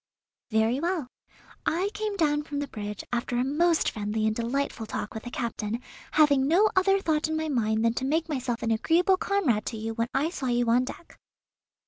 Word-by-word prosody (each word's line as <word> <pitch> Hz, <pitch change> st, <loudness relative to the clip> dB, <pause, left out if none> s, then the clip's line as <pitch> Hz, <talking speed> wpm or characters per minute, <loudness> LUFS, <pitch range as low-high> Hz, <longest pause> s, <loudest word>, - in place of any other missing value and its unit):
"Very 220 Hz, +3 st, +2 dB
well. 340 Hz, -2 st, -1 dB, 0.6 s
I 370 Hz, +5 st, 0 dB
came 425 Hz, -1 st, -2 dB
down 295 Hz, -4 st, +2 dB
from 295 Hz, -1 st, -6 dB
the 285 Hz, 0 st, -2 dB
bridge 210 Hz, -3 st, -6 dB
after 240 Hz, 0 st, -1 dB
a 245 Hz, -, +2 dB
most 320 Hz, +5 st, +2 dB
friendly 215 Hz, 0 st, -2 dB
and 220 Hz, 0 st, +1 dB
delightful 235 Hz, -1 st, -2 dB
talk 210 Hz, -, -4 dB
with 220 Hz, -, -5 dB
the -, -, -4 dB
captain, 230 Hz, -2 st, -3 dB, 0.3 s
having 285 Hz, -3 st, +4 dB
no 390 Hz, +8 st, +4 dB
other 390 Hz, +1 st, +4 dB
thought 315 Hz, -4 st, 0 dB
in 315 Hz, 0 st, -1 dB
my 315 Hz, 0 st, -2 dB
mind 220 Hz, -4 st, +1 dB
than 230 Hz, -, +3 dB
to 260 Hz, -, -2 dB
make 315 Hz, +4 st, +1 dB
myself 255 Hz, -6 st, -2 dB
an 225 Hz, -, +1 dB
agreeable 340 Hz, -, +3 dB
comrade 295 Hz, -, +1 dB
to 225 Hz, -, -3 dB
you 225 Hz, +1 st, -3 dB
when 230 Hz, +1 st, -1 dB
I 290 Hz, +5 st, 0 dB
saw 270 Hz, -6 st, -4 dB
you 240 Hz, -1 st, +1 dB
on 250 Hz, +2 st, +4 dB
deck." 335 Hz, -, -10 dB
265 Hz, 200 wpm, -27 LUFS, 230-320 Hz, 0.6 s, having